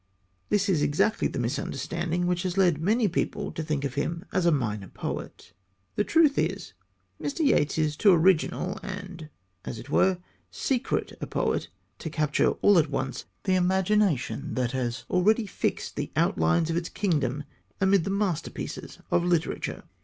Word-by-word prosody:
This 205 -1 +2
is 175 -7 +2
exactly 155 +10 +2
the - - -6
misunderstanding 165 +7 -2
which 175 0 0
has 185 0 -3
led 175 -5 +3
many 215 +5 +2
people 180 - -2
to - - -4
think 150 -3 -2
of 135 - -3
him 165 +5 -2
as 180 -2 +2
a - - +5
minor 105 -9 -1
poet. 90 - -6 0.4
The 210 - +2
truth 310 +2 +4
is - - -2 0.5
Mr. 290 +4 -2
Yeats 150 - +3
is 155 -1 +1
too 200 +6 +5
original 180 +1 +2
and, 185 -5 -7 0.3
as - - -5
it 125 +6 -10
were, 190 +2 +3 0.3
secret 240 - -1
a - - -3
poet - - -1 0.3
to 160 - -5
capture 150 -1 +2
all 205 -4 +7
at 155 -2 +1
once 135 -2 -3 0.2
the 190 - +1
imagination 190 - +1
that 125 -2 0
has 125 -2 -3
already 215 +5 +3
fixed 195 - -3
the - - -3
outlines 85 - +2
of 165 - 0
its 170 -1 -2
kingdom 145 - 0 0.4
amid 190 -2 +4
the 195 - -3
masterpieces 195 -5 -3
of 175 - +3
literature. 175 -2 -1
170 Hz, 160 wpm, -27 LUFS, 145-195 Hz, 0.5 s, all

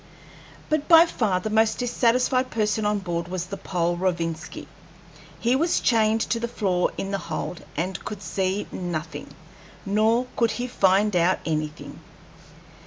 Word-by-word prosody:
But 305 -1 0
by 330 0 +8
far 210 - 0
the 215 - -3
most 220 0 +3
dissatisfied 250 +1 +1
person 215 -1 0
on 210 0 +1
board 170 -3 -3
was 180 -1 -3
the 195 - -6
Pole, 175 -3 -1
Rovinski. 170 -3 -3 0.7
He 240 +2 +2
was 330 +5 +2
chained 220 -1 +2
to 230 - -1
the 235 - -2
floor 190 -6 0
in 195 - -3
the 195 - -1
hold, 170 0 -5
and 185 +4 -3
could 210 -3 -7
see 190 +1 -1
nothing; 175 -2 -5 0.6
nor 220 +4 +2
could 230 -2 +2
he 245 - -2
find 200 -3 +2
out 175 +2 +3
anything. 155 -1 -4
200 Hz, 150 wpm, -24 LUFS, 180-230 Hz, 0.7 s, by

